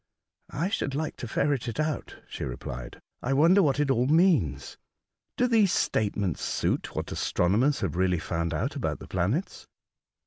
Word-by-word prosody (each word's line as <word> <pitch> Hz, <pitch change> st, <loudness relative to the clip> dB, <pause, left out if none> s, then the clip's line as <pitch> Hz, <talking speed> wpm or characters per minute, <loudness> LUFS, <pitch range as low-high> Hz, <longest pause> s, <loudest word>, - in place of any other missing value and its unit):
'' -, -, -56 dB
I 165 Hz, +7 st, -2 dB
should 140 Hz, -10 st, -2 dB
like 155 Hz, +1 st, -2 dB
to 120 Hz, -, -6 dB
ferret 135 Hz, +2 st, 0 dB
it 115 Hz, -, -4 dB
out," 155 Hz, -1 st, -2 dB
she -, -, -6 dB
replied. 65 Hz, 0 st, -6 dB
'' -, -, -51 dB
I 135 Hz, -, 0 dB
wonder 170 Hz, +8 st, +5 dB
what 145 Hz, -5 st, +2 dB
it 145 Hz, -2 st, +2 dB
all 125 Hz, 0 st, +2 dB
means. 155 Hz, -, +2 dB, 0.6 s
Do 250 Hz, -, +3 dB
these 220 Hz, -6 st, +4 dB
state 105 Hz, -2 st, 0 dB
ments 95 Hz, -7 st, -1 dB
suit -, -, -1 dB
what -, -, -3 dB
astronomers 115 Hz, +11 st, +1 dB
have 90 Hz, -6 st, -2 dB
really 90 Hz, 0 st, +2 dB
found 85 Hz, 0 st, -2 dB
out 75 Hz, -, -2 dB
about -, -, -2 dB
the -, -, -11 dB
planets 100 Hz, -, -2 dB
135 Hz, 180 wpm, -27 LUFS, -, 0.6 s, wonder